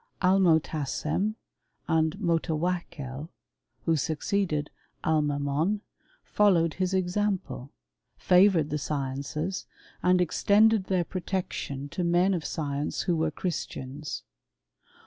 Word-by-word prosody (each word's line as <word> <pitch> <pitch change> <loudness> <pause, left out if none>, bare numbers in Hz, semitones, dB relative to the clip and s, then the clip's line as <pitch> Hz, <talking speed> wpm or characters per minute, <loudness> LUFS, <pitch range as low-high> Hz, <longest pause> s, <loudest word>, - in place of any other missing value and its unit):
Almotassem 170 +1 +2 0.5
and 160 +1 +2
Motawakkel, 165 -5 -2 0.6
who 165 - +3
succeeded 155 0 -1 0.3
Al 160 -1 +3
'^'^on, 145 +7 0 0.4
followed 175 -6 +3
his 185 -1 -1
example, 185 -7 -1 0.5
favoured 180 -5 +4
the 150 - 0
sciences, 140 +5 -3 0.4
^ 180 0 +4
extended 205 +4 +4
their 185 -2 +1
protection 180 -7 -3
to 180 - -3
men 175 +3 +3
of 170 -4 -2
science 145 -2 -2
who 175 -3 +1
^ere 160 -1 +1
Christians. 150 -4 -4
165 Hz, 95 wpm, -28 LUFS, 150-185 Hz, 0.6 s, favoured